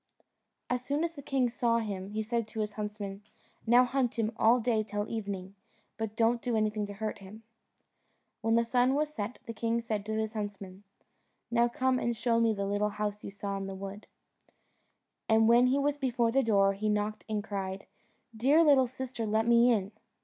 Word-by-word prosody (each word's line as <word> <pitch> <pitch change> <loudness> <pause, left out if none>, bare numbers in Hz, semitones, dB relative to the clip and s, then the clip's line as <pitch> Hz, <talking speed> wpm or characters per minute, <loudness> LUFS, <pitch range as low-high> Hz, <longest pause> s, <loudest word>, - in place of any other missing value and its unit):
As 250 0 -1
soon 285 +4 -1
as 335 0 -2
the 285 - -8
king 265 -2 +1
saw 235 -1 +1
him, 200 -4 -3
he 215 +1 -2
said 230 0 -1
to 220 0 -4
his 210 -1 -3
huntsmen, 210 -1 -5 0.5
"Now 245 +2 +6
hunt 250 -2 -1
him 225 -1 0
all 235 +3 +4
day 230 -2 +1
till 210 0 -3
evening, 200 -4 -5 0.4
but 220 -1 -4
don't 230 +1 +2
do 240 -2 -1
anything 215 -1 0
to 205 - -7
hurt 215 +1 -4
him." 205 +3 -12 1.0
When 225 0 +2
the 235 0 +3
sun 250 +3 +2
was 300 +1 -1
set 215 -1 -4
the 230 - -6
king 230 +1 0
said 220 -3 -3
to 220 - -2
his 220 0 -2
huntsman, 200 -2 -6 0.7
"Now 235 0 +4
come 255 +1 0
and 235 -1 -1
show 230 0 +1
me 230 -1 +3
the 200 -2 -2
little 205 +1 0
house 210 0 -4
you - - -5
saw 200 0 -4
in 195 0 -4
the 195 - -6
wood." 195 +2 -8 1.2
And 220 0 +5
when 240 +2 +6
he 260 +2 +2
was 285 +1 +1
before 245 -4 +1
the 270 +3 +3
door 200 -5 +3
he 215 +2 -2
knocked 210 0 -1
and 210 -1 -1
cried, 195 -2 -4 0.5
"Dear 280 +9 +4
little 275 -4 +5
sister, 255 -2 -5
let 220 +1 +1
me 235 +1 +5
in." 200 -3 0
220 Hz, 200 wpm, -30 LUFS, 205-240 Hz, 1.2 s, Now